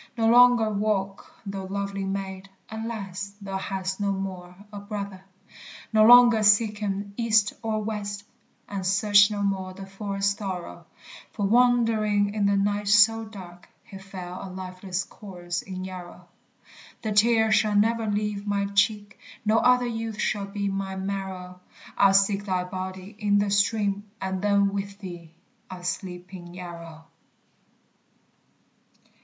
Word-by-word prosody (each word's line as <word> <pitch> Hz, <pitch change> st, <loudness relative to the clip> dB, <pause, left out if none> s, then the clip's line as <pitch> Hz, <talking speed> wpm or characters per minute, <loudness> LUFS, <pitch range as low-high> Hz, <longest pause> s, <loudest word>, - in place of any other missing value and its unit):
No 225 Hz, -, +1 dB
longer 240 Hz, -2 st, +6 dB
walk, 200 Hz, -2 st, -2 dB
thou 195 Hz, -1 st, -5 dB
lovely 200 Hz, 0 st, -3 dB
maid; 195 Hz, 0 st, -5 dB, 0.2 s
Alas, 200 Hz, -3 st, -5 dB
thou 195 Hz, -1 st, -4 dB
hast 190 Hz, 0 st, -4 dB
no 200 Hz, -1 st, 0 dB
more 185 Hz, -2 st, -5 dB, 0.2 s
a 205 Hz, -, -6 dB
brother! 200 Hz, -2 st, -6 dB, 0.7 s
No 215 Hz, 0 st, +6 dB
longer 240 Hz, -2 st, +8 dB
seek 210 Hz, 0 st, +4 dB
him 200 Hz, -1 st, -3 dB
east 220 Hz, -4 st, +3 dB
or 220 Hz, -1 st, -2 dB
west, 205 Hz, -1 st, -4 dB, 0.4 s
And 195 Hz, -2 st, -4 dB
search 205 Hz, +2 st, +5 dB
no 205 Hz, -1 st, -3 dB
more 190 Hz, -2 st, -2 dB
the 195 Hz, 0 st, -8 dB
forest 200 Hz, 0 st, -2 dB
thorough; 180 Hz, -, -6 dB, 0.5 s
For, 205 Hz, -, -2 dB
wandering 220 Hz, -3 st, +3 dB
in 205 Hz, -2 st, +1 dB
the 200 Hz, 0 st, +2 dB
night 205 Hz, +1 st, 0 dB
so 225 Hz, +2 st, +5 dB
dark, 180 Hz, -5 st, -12 dB
He 200 Hz, -4 st, -11 dB
fell 185 Hz, -2 st, -8 dB
a 195 Hz, -, -7 dB
lifeless 185 Hz, 0 st, -5 dB
corse 175 Hz, -3 st, -6 dB
in 185 Hz, -1 st, -7 dB
Yarrow. 185 Hz, -2 st, -9 dB, 0.8 s
The 215 Hz, -, -2 dB
tear 220 Hz, +1 st, +4 dB
shall 215 Hz, -1 st, +3 dB
never 225 Hz, +2 st, +2 dB
leave 210 Hz, 0 st, -2 dB
my 200 Hz, -1 st, 0 dB
cheek, 205 Hz, 0 st, +1 dB, 0.3 s
No 215 Hz, +2 st, +4 dB
other 250 Hz, 0 st, +4 dB
youth 225 Hz, -2 st, -4 dB
shall 205 Hz, -2 st, -1 dB
be 200 Hz, 0 st, -3 dB
my 195 Hz, -1 st, -3 dB
marrow; 190 Hz, -2 st, -5 dB, 0.4 s
I'll 195 Hz, -1 st, +5 dB
seek 195 Hz, +1 st, +3 dB
thy 185 Hz, -2 st, 0 dB
body 185 Hz, +2 st, -7 dB
in 205 Hz, -1 st, +2 dB
the 205 Hz, 0 st, +1 dB
stream, 200 Hz, 0 st, +1 dB
And 190 Hz, -1 st, -3 dB
then 200 Hz, -1 st, +2 dB
with 200 Hz, 0 st, -4 dB
thee 175 Hz, -5 st, -10 dB, 0.3 s
I'll 180 Hz, -1 st, -9 dB
sleep 180 Hz, 0 st, -5 dB
in 175 Hz, -1 st, -10 dB
Yarrow. 170 Hz, -3 st, -9 dB
200 Hz, 145 wpm, -25 LUFS, 190-210 Hz, 0.8 s, longer